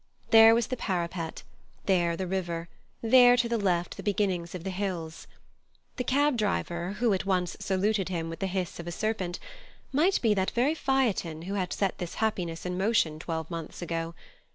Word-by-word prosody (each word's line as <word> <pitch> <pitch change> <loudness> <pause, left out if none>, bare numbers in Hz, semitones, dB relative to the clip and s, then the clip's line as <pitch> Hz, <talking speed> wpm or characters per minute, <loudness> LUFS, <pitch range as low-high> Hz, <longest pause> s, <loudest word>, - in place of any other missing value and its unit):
There 225 0 +9
was 235 -1 +2
the 255 - -3
parapet, 170 -5 -3 0.4
there 175 -3 +2
the 190 - -2
river, 175 -2 -3 0.3
there 245 +1 +7
to 245 -1 +2
the 235 -1 0
left 180 -3 0
the - - -5
beginnings 190 -5 -1
of 175 - -6
the 190 - -3
hills. 180 -4 -4 0.7
The 250 - -1
cab 280 +1 +2
driver, 185 -4 -1
who 225 0 +1
at 190 0 -2
once 180 -2 0
saluted 195 0 0
him 165 -3 -2
with 165 0 -6
the 195 - -1
hiss 185 -2 -3
of 170 - -7
a - - -3
serpent, 190 -2 -2 0.5
might 330 +8 +3
be 225 -3 +3
that 190 -2 +1
very 260 +6 +2
Phaethon 235 - 0
who 190 +3 -4
had 185 -3 -1
set 195 -2 -1
this 175 -2 -5
happiness 180 -7 -2
in 180 0 -2
motion 190 -7 +2
twelve 160 0 -4
months 165 +1 -6
ago. 165 0 -3
190 Hz, 185 wpm, -28 LUFS, 170-220 Hz, 0.7 s, There